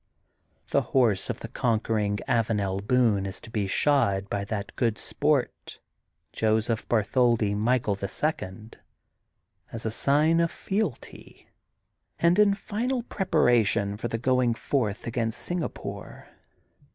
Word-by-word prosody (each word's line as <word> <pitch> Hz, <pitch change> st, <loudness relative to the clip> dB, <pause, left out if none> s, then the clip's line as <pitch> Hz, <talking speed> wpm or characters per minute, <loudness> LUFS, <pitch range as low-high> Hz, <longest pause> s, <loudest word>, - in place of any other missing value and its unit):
The -, -, +3 dB
horse 115 Hz, -8 st, +1 dB
of -, -, -4 dB
\he -, -, -4 dB
conquering 110 Hz, -3 st, 0 dB
Avanel 105 Hz, -4 st, 0 dB
Boone 105 Hz, -3 st, +2 dB
is 95 Hz, -, -7 dB
to 115 Hz, -, -12 dB
be 105 Hz, -3 st, -1 dB
shod 100 Hz, -6 st, +1 dB
by 100 Hz, -, -1 dB
that 100 Hz, 0 st, -5 dB
good 115 Hz, -4 st, 0 dB
sport, -, -, -1 dB, 0.6 s
Joseph 110 Hz, +1 st, 0 dB
Bar 110 Hz, -3 st, +3 dB
tholdi 115 Hz, -3 st, +2 dB
Michael, 115 Hz, 0 st, +1 dB
the 100 Hz, 0 st, -4 dB
Second, 110 Hz, -, -4 dB, 0.9 s
as 115 Hz, -1 st, -6 dB
a 110 Hz, -, 0 dB
sign 150 Hz, +7 st, +2 dB
of 170 Hz, 0 st, +2 dB
fealty, 195 Hz, -, -5 dB, 0.7 s
and 170 Hz, +4 st, +3 dB
in 205 Hz, -1 st, +5 dB
final 235 Hz, +5 st, -2 dB
preparation 120 Hz, -, +2 dB
for 115 Hz, +3 st, -4 dB
the 115 Hz, -, -2 dB
going 125 Hz, 0 st, +2 dB
forth 110 Hz, -6 st, -2 dB
against 115 Hz, -1 st, -2 dB
Singapore. 175 Hz, -2 st, -6 dB
115 Hz, 125 wpm, -26 LUFS, 105-140 Hz, 0.9 s, in